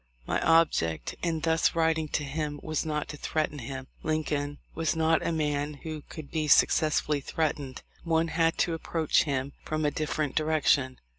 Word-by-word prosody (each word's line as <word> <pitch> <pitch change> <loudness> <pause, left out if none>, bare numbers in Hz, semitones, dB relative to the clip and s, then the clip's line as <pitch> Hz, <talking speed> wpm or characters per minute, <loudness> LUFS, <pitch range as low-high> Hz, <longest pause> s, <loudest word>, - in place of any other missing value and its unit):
My - - 0
object 160 - +2
in 165 -2 -1
thus 160 +1 +2
writing 160 -1 +2
to 150 - -1
him 145 +1 -3
was 155 0 -2
not 150 -1 -1
to 150 - -6
threaten 150 -1 -2
him. 130 +2 -6 0.2
Lincoln 150 -2 -1 0.2
was 165 +1 0
not 160 -2 +2
a - - 0
man 150 -2 -1
who 155 -2 -5
could 155 -3 -9
be 155 -2 -1
successfully 150 0 +3
threatened; 145 -3 -2 0.2
one 165 0 +1
had 165 +1 +1
to 170 - -3
approach 165 -1 +1
him 140 -1 -2
from 155 0 -2
a 145 - +2
different 155 -1 -2
direction. 150 -4 +2
155 Hz, 165 wpm, -28 LUFS, 145-160 Hz, 0.2 s, successfully